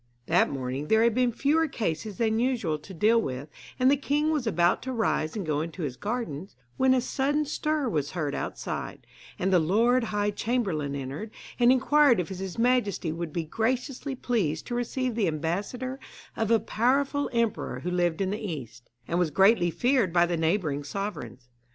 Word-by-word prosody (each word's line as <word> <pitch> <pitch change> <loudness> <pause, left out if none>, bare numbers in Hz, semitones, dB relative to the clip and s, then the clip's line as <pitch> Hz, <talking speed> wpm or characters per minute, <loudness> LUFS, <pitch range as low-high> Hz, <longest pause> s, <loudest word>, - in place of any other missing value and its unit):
That - - +3
morning 135 +1 -4
there 220 +4 +4
had 235 -1 +3
been 250 0 +2
fewer 300 +7 +2
cases 205 - -3
than 220 -1 +1
usual 230 -12 0
to 155 +6 -13
deal 215 +6 +3
with, 135 - -5 0.3
and 255 +1 +4
the - - +5
king 295 +2 0
was 290 -7 -1
about 175 -4 +2
to 260 - -4
rise 220 -9 0
and 205 -4 -3
go 150 -1 0
into 165 +2 -5
his 135 -4 -3
gardens, 200 - -4 0.2
when 260 0 +4
a 255 - +2
sudden 285 +4 0
stir 305 -1 -1
was 150 - -1
heard 150 -5 -2
outside, - - -5 0.3
and 190 +1 0
the 180 - +6
lord 230 +9 +3
high 205 -1 0
chamberlain 195 - -1
entered, 140 +10 -5 0.3
and 240 0 +6
inquired 265 -2 +4
if 175 - -2
his 190 0 -6
majesty 230 -8 +1
would 165 0 -4
be 170 +2 -2
graciously 250 - -2
pleased 200 - -1
to 245 - -5
receive 245 +1 -1
the 215 -4 +1
ambassador 200 - -3 0.4
of 220 -1 -1
a 230 -1 +5
powerful 270 +7 +1
emperor 230 - -1
who 180 - -3
lived 175 -1 0
in 190 0 0
the 210 - -3
east, 140 - -7 0.2
and 170 - 0
was 175 -3 +2
greatly 190 +2 +4
feared 245 - +2
by 170 0 +4
the 175 0 -1
neighbouring 160 -3 0
sovereigns. 140 - -6
210 Hz, 185 wpm, -27 LUFS, 160-250 Hz, 0.4 s, the